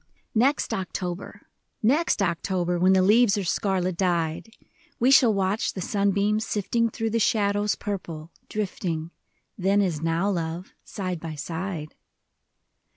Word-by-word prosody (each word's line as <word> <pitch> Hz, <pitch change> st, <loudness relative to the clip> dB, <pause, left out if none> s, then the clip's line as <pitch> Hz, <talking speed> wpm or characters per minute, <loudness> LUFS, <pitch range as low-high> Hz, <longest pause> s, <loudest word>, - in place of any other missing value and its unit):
EXT 265 Hz, +6 st, +2 dB
October, 185 Hz, -1 st, -4 dB, 0.4 s
next 270 Hz, -1 st, +2 dB
October, 175 Hz, 0 st, -1 dB
When 185 Hz, +2 st, +5 dB
the 190 Hz, -1 st, +4 dB
leaves 210 Hz, +1 st, +5 dB
are 200 Hz, -, -1 dB
scarlet 185 Hz, -1 st, 0 dB
dyed, 170 Hz, 0 st, 0 dB, 0.5 s
We 250 Hz, +3 st, +4 dB
shall 250 Hz, -4 st, +7 dB
watch 195 Hz, +1 st, 0 dB
the -, -, -6 dB
sunbeams 200 Hz, +2 st, +1 dB
sifting 230 Hz, +3 st, 0 dB
Through 225 Hz, 0 st, -3 dB
the 230 Hz, -, +1 dB
shadows 205 Hz, -1 st, +2 dB
purple, 170 Hz, -6 st, -6 dB, 0.2 s
drifting. 175 Hz, -6 st, -3 dB, 0.5 s
Then 195 Hz, +2 st, +3 dB
as 175 Hz, -7 st, 0 dB
now, 165 Hz, +4 st, 0 dB
love, 170 Hz, 0 st, -4 dB
side 185 Hz, -4 st, -4 dB
by 160 Hz, -1 st, -6 dB
side. 165 Hz, 0 st, -5 dB
190 Hz, 130 wpm, -25 LUFS, 175-210 Hz, 0.5 s, shall